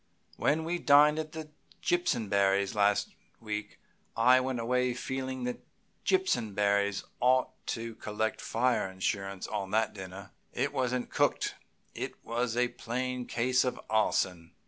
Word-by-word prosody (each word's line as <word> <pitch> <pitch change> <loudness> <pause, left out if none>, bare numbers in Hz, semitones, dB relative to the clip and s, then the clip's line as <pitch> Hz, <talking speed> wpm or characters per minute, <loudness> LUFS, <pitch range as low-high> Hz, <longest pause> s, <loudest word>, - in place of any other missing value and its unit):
When 155 +3 +1
we 175 +2 -2
dined 150 +1 +6
at 155 -1 -4 0.5
Jimpsonberrys' 100 - +1
last 105 -1 +2 0.3
week 105 -1 -5 0.4
I 125 +3 +6
went 130 -1 -2
away 125 +1 +1
feeling 130 0 -4
that 125 0 -4 0.4
Jimpsonberry 100 - +1 0.2
ought 130 +1 +3 0.2
to 115 0 -3
collect 110 0 -3
fire 120 -4 +1
insurance 95 0 -2
on 100 -3 -3
that 110 +2 +1
dinner. 95 -1 -9 0.2
It - - -1
wasn't 125 -2 -1
cooked; - - +1 0.4
it - - -5
was 120 0 -1
a 125 0 +3
plain 125 +1 -3
case 125 +2 +2
of 125 - -2
arson." 90 -6 +1
115 Hz, 125 wpm, -30 LUFS, 100-130 Hz, 0.5 s, dined